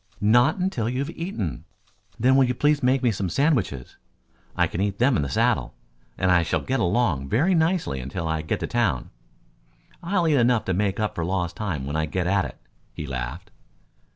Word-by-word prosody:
"Not 120 - +4
until 180 - -1
you 125 - -3
have 140 +4 -2
eaten." 165 - -4 0.6
"Then, 130 +3 +4
will 135 -1 +5
you 125 0 -1
please 150 +3 +2
make 130 +1 +2
me 120 - +3
some 95 -3 -2
sandwiches? 105 - 0 0.6
I - - +3
can 90 - -3
eat 100 -1 -1
them 125 +3 +3
in - - +1
the 70 - -2
saddle, - - +1 0.4
and 95 0 +2
I 90 -1 +5
shall 85 - -1
get 135 +1 -1
along 85 - +1
very 160 +12 +2
nicely 160 - +1
until 80 +7 -4
I 80 -1 -1
get 80 - -3
to - - -2
town. - - 0 0.9
I'll 175 -1 0
eat 150 -3 +3
enough 120 -1 +2
to 95 - 0
make 100 +1 0
up 105 -1 -1
for 85 - -3
lost 90 -1 -2
time 85 -10 -3
when 70 +2 -4
I 80 0 0
get 90 +3 -2
at 100 +1 +2
it," - - -8 0.3
he 75 - -7
laughed. 70 +9 -5
105 Hz, 205 wpm, -24 LUFS, 85-135 Hz, 0.9 s, will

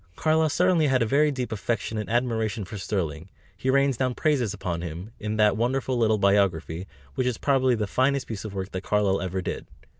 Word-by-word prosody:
Carlyle 160 +3 +2
certainly 175 -1 +3
had 130 -3 +3
a - - +1
very 145 +7 +3
deep 130 -5 -3
affection 110 +1 -2
and 105 - -5
admiration 115 -3 0
for 105 - -8
Sterling; 90 -4 -3 0.3
he 115 +7 -3
rains 140 -1 +3
down 130 -1 0
praises 135 -9 +1
upon 90 -4 -4
him, 85 +5 -6
in 105 0 -3
that 105 -1 +4
wonderful 130 +3 0
little 110 -2 +2
biography, 95 -4 +1 0.3
which 125 - 0
is 125 -3 -1
probably 130 -3 +2
the 110 -2 -1
finest 130 +5 +1
piece 110 -3 -6
of 105 -2 -7
work 95 0 -4
that 95 - -4
Carlyle 100 -1 +1
ever 95 0 -3
did. - - -4
110 Hz, 205 wpm, -26 LUFS, 100-130 Hz, 0.3 s, that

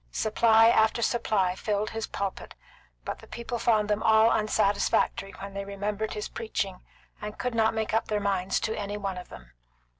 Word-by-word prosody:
Supply 220 - +4
after 220 +1 +3
supply 205 -7 +1
filled 210 +2 -2
his 225 0 -4
pulpit, 200 -1 -5 0.5
but - - -4
the - - -14
people 235 0 -5
found 215 -3 +2
them 210 0 0
all 220 +1 +5
unsatisfactory 205 -2 +1
when 195 0 -7
they 200 0 -4
remembered 205 +2 -3
his 210 - -4
preaching, 195 -4 -3 0.4
and 210 0 -6
could 250 -1 -2
not 225 0 +2
make 220 -1 -2
up 225 - +1
their 210 -1 0
minds 195 -2 0
to 220 - -1
any 205 0 -4
one 195 -3 -3
of 180 - -11
them. - - -13
210 Hz, 180 wpm, -27 LUFS, 200-220 Hz, 0.5 s, all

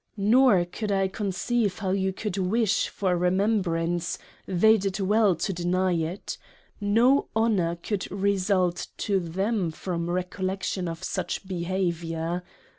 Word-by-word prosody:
Nor 210 -2 +5
could 205 +4 -4
I 195 -1 +2
conceive 200 +1 -1
how 190 -2 -2
you 190 0 +1
could 200 0 -4
wish 205 +3 +1
for 190 -2 -1
a - - +3
Remembrance 175 -2 0 0.3
they 220 +5 +5
did 195 -1 -2
well 205 0 +3
to 195 +4 -2
deny 180 +1 +1
it 170 - -3 0.4
no 230 +7 +3
Honour 205 -7 +2
could 190 +3 -4
result 190 -2 +1
to 200 -3 +1
them 190 +2 -1
from 170 +1 -4
Recollection 185 +1 -2
of 165 -1 -6
such 185 +1 -3
behaviour. 170 -2 -2
190 Hz, 130 wpm, -26 LUFS, 175-205 Hz, 0.4 s, Nor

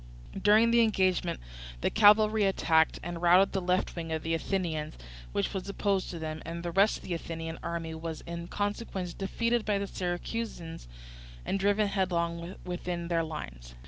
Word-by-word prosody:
During 215 +3 +5
the 235 0 +5
engagement 190 -5 +2 0.4
the - - +1
cavalry 215 0 +6
attacked 160 -4 +3
and 175 0 -5
routed 180 +3 +6
the 190 - -1
left 180 +1 0
wing 165 -2 -5
of 160 -1 -2
the 165 - -1
Athenians, 165 -3 -2 0.4
which 100 - -1
was 195 0 -4
opposed 200 -1 0
to 175 - -5
them; 155 -1 -5
and 170 +1 -6
the 175 - -3
rest 200 +4 +4
of - - -15
the 180 - -3
Athenian 165 -1 -5
army 165 -1 -4
was 160 0 -5
in 170 0 -6
consequence 205 -3 -3
defeated 230 +4 0
by 210 -2 +1
the 200 - -1
Syracusans 175 - -4 0.6
and 195 - 0
driven 205 +2 +3
headlong 175 -2 -1
within 175 -1 -4
their 165 -1 +2
lines. - - -7
175 Hz, 170 wpm, -30 LUFS, 165-200 Hz, 0.6 s, cavalry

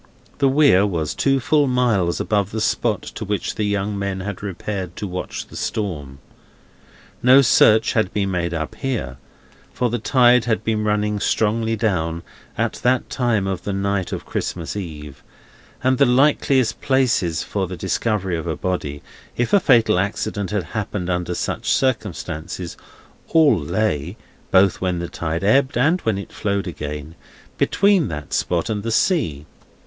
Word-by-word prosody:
The 140 -1 +4
Weir 135 -9 +5
was 85 -7 -1
full 135 -1 +1
two 145 +3 +2
miles 110 -9 +1
above 100 -2 0
the 110 - -4
spot 110 -1 0
to - - -7
which 105 -1 -2
the 110 - -2
young 100 0 -1
men 100 -1 -3
had 100 -1 -5
repaired 100 -1 -5
to - - -5
watch 90 -2 -5
the - - -14
storm. 75 -10 -4 1.0
No 130 +3 +7
search 110 -2 +5
had 110 -3 +1
been 100 -2 -1
made 85 -2 -1
up 80 -2 -3
here, 120 - -3 0.5
for 125 -2 -1
the 120 - -1
tide 125 0 +4
had 110 -2 0
been 110 -1 0
running 105 0 0
strongly 110 +2 +1
down, 85 -7 -1 0.3
at - - -1
that 125 0 +1
time 120 -6 +1
of 95 -2 -2
the 100 - -3
night 100 -1 -1
of - - -5
Christmas 85 +1 -4
Eve, 75 -7 -7 0.6
and 130 0 +2
the 140 - +6
likeliest 130 -2 +2
places 125 - +1
for 95 -2 -2
the 90 0 -7
discovery 95 +1 -1
of 80 +1 -4
a 80 - -2
body, 75 -6 -3 0.3
if 120 - -1
a 205 - +7
fatal 115 - +4
accident 100 0 -2
had 105 -3 -1
happened 100 -1 -4
under 90 0 -2
such - - -3
circumstances, 90 - -2 0.5
all 155 -6 +5
lay—both 95 +2 0
when 90 -2 0
the 85 0 -4
tide 80 +2 -3
ebbed, 130 +5 +3
and 160 +9 +2
when 110 -3 0
it 100 - -8
flowed 100 -2 -1
again—between 75 - -1
that 75 -3 -6
spot 85 -2 0
and 105 -2 -2
the 115 - -3
sea. 85 - +1
100 Hz, 160 wpm, -21 LUFS, 90-120 Hz, 1.0 s, No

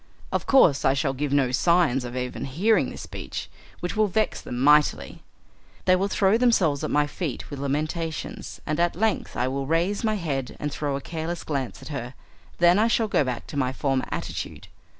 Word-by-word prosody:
Of - - -2
course 165 - +5
I 135 - +3
shall 135 0 0
give 140 +1 -2
no 140 -3 +2
signs 155 -2 +3
of 120 +1 -5
even 125 0 -3
hearing 185 +12 +2
this - - -8
speech, - - -7 0.3
which 175 - -3
will 215 0 +3
vex 215 +3 0
them 120 - -6
mightily. 150 +3 +3 0.6
They 185 - +5
will 190 +2 +1
throw 200 +2 +2
themselves 185 - +3
at - - -1
my 150 0 +3
feet 145 -2 -5
with 140 - -5
lamentations, 155 +3 -3
and 150 +1 -1
at 175 0 +2
length 220 +4 -1
I 125 - +1
will 135 +1 -2
raise 175 - +1
my 215 -1 +1
head 140 -9 -3
and 150 - -3
throw 145 -1 -2
a 140 - -4
careless 165 +3 -4
glance 135 -5 -3
at - - -9
her, 130 -3 -5 0.4
then 175 +3 +5
I 220 - +4
shall 230 -1 +2
go 195 - +2
back 125 -3 -4
to 145 - -7
my 130 -2 +1
former 135 -1 0
attitude. - - -5
150 Hz, 200 wpm, -25 LUFS, 135-180 Hz, 0.6 s, course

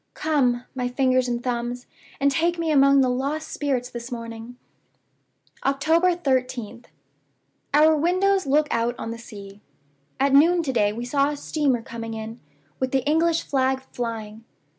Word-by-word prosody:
Come, 255 -6 +1
my 250 -2 -2
fingers 255 0 +1
and 240 0 -2
thumbs, 245 0 -3 0.3
and 280 0 +3
take 335 +5 +1
me 330 -1 -1
among 275 -1 +5
the 260 - +3
lost 275 +5 -2
spirits 265 -4 -2
this 240 0 -8
morning!" 230 0 -7 1.1
"October 320 +6 +2
13th. 255 -6 -2 0.9
Our 310 +2 +5
windows 370 +4 +1
look 295 +2 +3
out 235 +1 0
on 225 - -5
the 230 - -7
sea. 205 -3 -11 0.6
At 275 0 +2
noon 335 +5 +5
to 265 -4 -2
day 205 -4 +2
we 235 +3 -5
saw 275 +3 +1
a 295 - -4
steamer 280 -6 0
coming 230 -1 -6
in, 220 +1 -7 0.4
with 260 - 0
the 265 -2 0
English 330 +2 +2
flag 265 -1 0
flying. 225 -2 -5
260 Hz, 155 wpm, -24 LUFS, 235-295 Hz, 1.1 s, among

